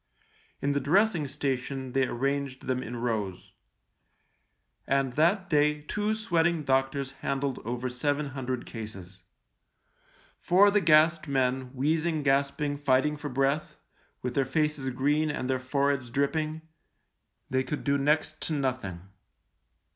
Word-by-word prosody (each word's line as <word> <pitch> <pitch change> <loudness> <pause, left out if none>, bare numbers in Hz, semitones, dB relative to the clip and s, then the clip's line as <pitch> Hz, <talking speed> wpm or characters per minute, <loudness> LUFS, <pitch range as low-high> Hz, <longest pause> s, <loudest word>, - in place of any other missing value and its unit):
In 140 - +2
the 140 - +1
dressing 170 +2 +2
station 135 -1 -3
they 135 0 +2
arranged 135 +1 -2
them 130 0 -1
in 120 -1 -6
rows; 110 -6 -3 1.3
and 135 -2 +1
that 175 +7 +2
day 150 -2 +2
two 210 +7 -1
sweating 170 -6 +1
doctors 135 0 0
handled 135 -1 -1
over 120 +2 -3
seven 145 +4 -1
hundred 130 -2 -4
cases. 95 -4 -9 1.1
For 195 +3 +5
the 210 0 +3
gassed 160 -1 +4
men, 130 -1 0
wheez 155 +5 +1
ing, 160 -3 -1
gasping, 140 +1 +1
fighting 145 +1 +2
for 150 0 -6
breath, 135 +3 0 0.5
with 125 0 -2
their 135 - +2
faces 150 0 -1
green 145 +5 +1
and 145 -3 -3
their 130 0 0
foreheads 140 -1 0
dripping, 155 +4 -1 0.9
they 130 0 +2
could 145 +3 -4
do 140 - +2
next 155 +2 +1
to 160 - -2
nothing. 130 - -2
140 Hz, 130 wpm, -28 LUFS, 130-155 Hz, 1.3 s, For